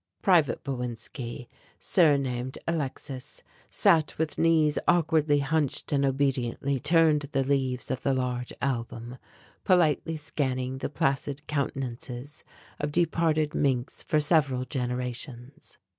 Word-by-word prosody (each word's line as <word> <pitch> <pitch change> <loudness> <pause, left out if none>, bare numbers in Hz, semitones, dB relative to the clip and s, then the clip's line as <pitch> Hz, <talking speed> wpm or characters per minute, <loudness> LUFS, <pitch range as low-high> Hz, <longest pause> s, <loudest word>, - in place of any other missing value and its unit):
Private 165 -8 +3
Bowinski, 125 -1 -5 0.3
surnamed 135 -6 +2
Alexis, 140 -4 -4 0.3
sat 165 -7 +2
with 160 -1 -2
knees 160 -2 +3
awkwardly 160 -3 +3
hunched 145 0 -1
and 140 -1 +2
obediently 135 -1 0
turned 155 -2 +3
the 135 -1 +2
leaves 130 -2 -1
of 130 - -2
the 135 -1 +1
large 125 -1 -2
album, 120 -2 -3 0.4
politely 165 -3 +2
scanning 130 -3 -2
the - - -3
placid 140 +1 -1
countenances 135 -2 -4 0.4
of 150 0 -2
departed 160 -2 +1
Minks 130 -3 0
for 155 - +1
several 140 -5 +2
generations. 125 +1 -5
140 Hz, 110 wpm, -27 LUFS, 125-155 Hz, 0.4 s, Private